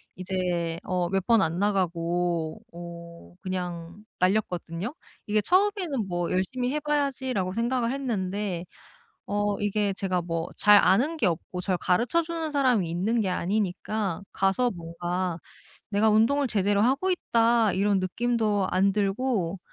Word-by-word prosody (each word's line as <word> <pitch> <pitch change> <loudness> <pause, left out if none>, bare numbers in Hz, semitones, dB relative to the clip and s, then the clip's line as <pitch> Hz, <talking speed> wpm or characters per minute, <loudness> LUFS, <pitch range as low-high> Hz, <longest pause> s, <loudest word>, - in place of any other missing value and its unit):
이제 175 -2 -2
어 180 -1 0
몇 195 -1 0
번 225 -4 +5
안 165 +3 -1
나가고 175 -4 0
어 170 0 -10
그냥 180 0 -5 0.2
날렸거든요? 185 - -1 0.3
이게 215 +1 +2
처음에는 365 - +1
뭐 175 -1 -2
'열심히 245 +8 -1
해 300 - 0
봐야지.'라고 265 -10 -1
생각을 235 +1 0
했는데 200 -8 -2 0.6
어 205 0 0
이게 205 0 0
제가 185 -2 -1
뭐 165 0 -3
잘 210 0 +6
아는 245 - +3
게 280 - +1
없고 180 +1 -2
절 185 -1 0
가르쳐 235 - +2
주는 325 -1 -4
사람이 255 - +2
있는 200 +8 0
게 195 - 0
아니니까 195 +1 -1
가서 195 +6 +1
뭔가 175 -1 -3 0.5
'내가 215 +2 +3
운동을 235 +7 +3
제대로 205 -2 +1
하고 275 - +2
있다.' 230 - +2
이런 200 0 +2
느낌도 210 0 0
안 190 +2 +3
들고 200 -2 0
200 Hz, 275 characters per minute, -26 LUFS, 180-235 Hz, 0.6 s, 잘